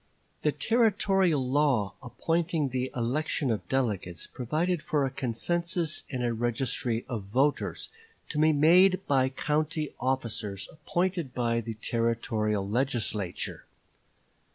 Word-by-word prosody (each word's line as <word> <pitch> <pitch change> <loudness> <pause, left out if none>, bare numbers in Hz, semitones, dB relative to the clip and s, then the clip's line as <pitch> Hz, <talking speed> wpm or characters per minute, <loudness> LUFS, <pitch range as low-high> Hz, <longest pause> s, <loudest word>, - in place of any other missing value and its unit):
The 150 - +2
Territorial 195 - +2
law 130 -7 +2
appointing 160 +4 -1
the 130 0 -2
election 130 +2 0
of 110 - -3
delegates 105 -10 -1
provided 155 +7 -1
for 145 -2 0
a 135 - -4 0.2
census 170 +3 0
and 125 -3 -3
a 120 -1 +1
registry 120 0 -1
of 115 -7 -4
voters, 135 +8 0 0.4
to 150 - -2
be 155 +1 +5
made 180 +6 +5
by 130 -2 +3
county 150 +2 -1
officers 115 -6 -2
appointed 170 -2 -2
by 115 -1 +1
the 115 0 -6
Territorial 110 -3 -1
Legislature. 110 -5 -1
130 Hz, 115 wpm, -28 LUFS, 115-155 Hz, 0.4 s, be